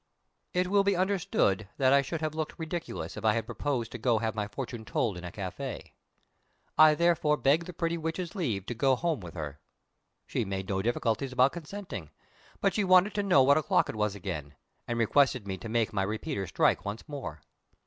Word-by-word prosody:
It 180 0 +3
will 200 +1 +3
be 200 -1 +2
understood 180 - +1
that 130 -1 +4
I 140 - +6
should 155 +4 -4
have 155 -1 -1
looked 155 -1 -4
ridiculous 160 - -5
if 110 - -6
I 110 -1 +4
had 115 -1 -1
proposed 120 0 -2
to 120 -3 +1
have 110 0 -1
my 105 -2 -2
fortune 120 +1 -6
told 110 -2 -1
in 90 - -8
a 90 - -6
café. 95 -2 -6 0.8
I 155 -1 +7
therefore 165 -3 +3
begged 150 +5 +2
the 180 - -7
pretty 170 0 -1
witch's 165 +2 -3
leave 120 - -2
to 120 - -3
go 130 +3 +3
home 165 +1 -1
with 90 -3 -10
her. 75 -3 -5 0.7
She - - -1
made 95 -1 -4
no 95 -1 0
difficulties 120 +4 -1
about 130 +2 +4
consenting, 170 - -7 0.5
but 195 - +2
she 210 - +1
wanted 185 +2 +5
to 205 - 0
know 180 -9 +5
what 140 +3 +5
o'clock 155 - +2
it - - -4
was 105 -1 0
again, 80 -7 -5 0.3
and 120 - -2
requested 125 0 +3
me 95 - -2
to 115 - -7
make 115 -1 0
my 100 - +1
repeater 105 - -2
strike - - +2
once 100 +7 -6
more. 135 - -6
130 Hz, 200 wpm, -29 LUFS, 105-160 Hz, 0.8 s, I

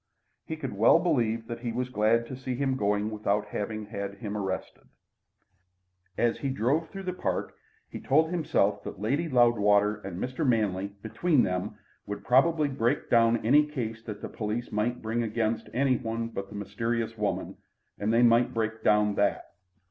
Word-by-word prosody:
He 160 - -3
could 135 -7 -5
well 105 +9 +5
believe 120 -10 0
that 115 +1 -6
he 120 -1 -3
was 125 +2 -2
glad 115 0 +2
to 130 - -7
see 130 -1 -4
him 135 0 0
going 105 -2 0
without 105 -1 0
having 110 +1 -4
had 100 -1 -5
him 105 0 -6
arrested. 95 -2 -4 1.3
As 120 -1 +1
he 140 - -2
drove 135 +6 0
through 195 0 -7
the 180 -1 -3
park 180 - -2 0.3
he - - -8
told 160 +4 +2
himself 105 - +1
that - - -7
Lady 140 +11 0
Loudwater 105 -5 +4
and 95 -4 -7
Mr. 130 +7 -3
Manley 105 -7 +1 0.2
between 125 +6 +2
them 90 -1 -2 0.3
would 100 0 -5
probably 150 +5 +4
break 135 0 -1
down 115 -1 +4
any 145 +6 +6
case 115 -7 -4
the 110 -2 -6
police 110 +2 -4
might 115 +4 -1
bring 115 +2 -1
against 110 0 -1
any 130 +1 +2
one 115 -1 -3
but 100 -3 -6
the 105 - -10
mysterious 115 +3 -2
woman, 105 -2 -2 0.4
and 105 +2 0
they 115 +1 +4
might 120 0 +4
break 110 0 -2
down 105 0 +3
that. 100 0 0
115 Hz, 170 wpm, -28 LUFS, 105-125 Hz, 1.3 s, any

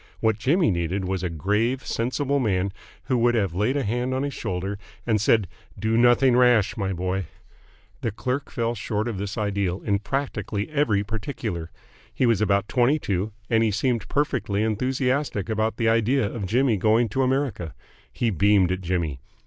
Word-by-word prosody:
What 110 -1 +1
Jimmy 145 - +3
needed 90 +2 -1
was 95 -1 -2
a 90 - -1
grave, 105 - 0
sensible 140 +4 0
man 100 -5 0 0.3
who 125 -2 0
would 120 +1 +3
have 100 -6 0
laid 105 +10 +1
a 140 - 0
hand 125 +4 -1
on 130 - -1
his 140 -1 -3
shoulder 95 +2 -3 0.3
and 110 -3 +1
said 110 -2 +3 0.3
"Do 110 +3 0
nothing 120 +2 +5
rash, 120 -4 +4
my 95 -3 -2
boy!" 95 +1 -2 0.7
The - - 0
clerk 125 +6 -3
fell 115 -1 -1
short 110 0 -2
of 110 -5 -3
this 100 +3 -4
ideal 100 -3 -1
in 100 -2 0
practically 105 -2 -3
every 125 -10 +2
particular. 105 -5 -4 0.4
He - - 0
was 115 -4 +3
about 100 -1 +2
twenty 130 +4 +3
two, 100 - -2 0.2
and 115 -1 +2
he 110 - +2
seemed 115 +3 0
perfectly 110 -8 0
enthusiastic 125 0 -1
about 110 0 0
the 115 - +1
idea 115 +3 +3
of 100 -1 -4
Jimmy 120 +1 +2
going 110 +4 +3
to 135 +7 -1
America. 130 - -1 0.4
He 115 -2 0
beamed 100 -1 +3
at 95 0 -2
Jimmy. 85 -6 -2
110 Hz, 175 wpm, -24 LUFS, 100-125 Hz, 0.7 s, nothing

